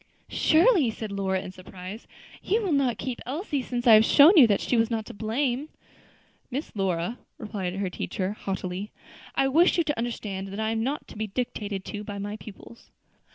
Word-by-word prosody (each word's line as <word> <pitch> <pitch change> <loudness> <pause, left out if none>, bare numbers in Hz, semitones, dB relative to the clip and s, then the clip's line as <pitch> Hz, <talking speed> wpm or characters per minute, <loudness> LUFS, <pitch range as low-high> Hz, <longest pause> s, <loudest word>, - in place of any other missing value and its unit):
"Surely," 330 - +4
said 220 -1 -6
Lora, 190 -1 -1
in 185 - -7
surprise, 185 +3 -10 0.3
"you 440 +3 0
will 380 - -1
not 265 -6 +2
keep 250 -2 -4
Elsie, 290 - -2
since 245 -1 -4
I 230 - +8
have 215 0 +8
shown 295 - +7
you 280 -8 +9
that 205 -2 +2
she - - 0
was 225 -1 +3
not 225 -2 -2
to - - -9
blame." 245 +6 -1 0.8
"Miss 275 +5 -4
Lora," 190 +2 -1 0.2
replied 190 -4 -4
her 195 -1 -2
teacher, 185 +1 -3
haughtily, 190 -1 -4 0.5
"I 270 - +3
wish 330 +8 +4
you 340 - +3
to 295 -2 -2
understand 210 -5 -4
that 195 +2 -7
I 220 0 0
am 225 0 -1
not 275 +6 -2
to - - -11
be 215 0 -2
dictated 205 -3 -4
to 210 0 -5
by 205 -1 -6
my 205 +1 -4
pupils." 215 +2 -13
220 Hz, 195 wpm, -26 LUFS, 195-265 Hz, 0.8 s, you